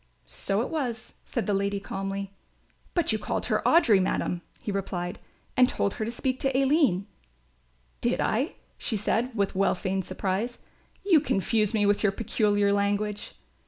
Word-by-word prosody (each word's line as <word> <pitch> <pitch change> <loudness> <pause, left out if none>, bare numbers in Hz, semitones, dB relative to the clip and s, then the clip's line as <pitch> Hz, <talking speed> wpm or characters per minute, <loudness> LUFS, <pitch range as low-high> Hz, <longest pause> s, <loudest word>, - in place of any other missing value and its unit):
"So 195 - 0
it - - -5
was," 250 -8 -3
said 240 - -2
the 205 - 0
lady, 200 0 0
calmly. 195 0 -4 0.6
"But 345 -8 +2
you 215 - 0
called - - -2
her - - +1
Audry, 235 - +6
madam," 180 -1 -1 0.2
he 210 - -4
replied, 180 -3 -3 0.4
"and 250 0 +5
told 200 - 0
her 215 - -3
to - - -3
speak 255 +2 -2
to 270 -1 +1
Aline." 270 - +3 1.0
"Did - - +1
I?" - - 0 0.2
she 220 - -1
said 225 +4 +1
with 200 -3 0
well 195 +1 +2
feigned 190 0 -2
surprise. 195 +6 -2 0.5
"You 350 -6 +6
confused 215 -2 +1
me 210 - +3
so - - +3
with 205 0 +3
your 205 - +3
peculiar 205 -1 +1
language." 205 +1 -1
205 Hz, 165 wpm, -27 LUFS, 195-235 Hz, 1.0 s, Audry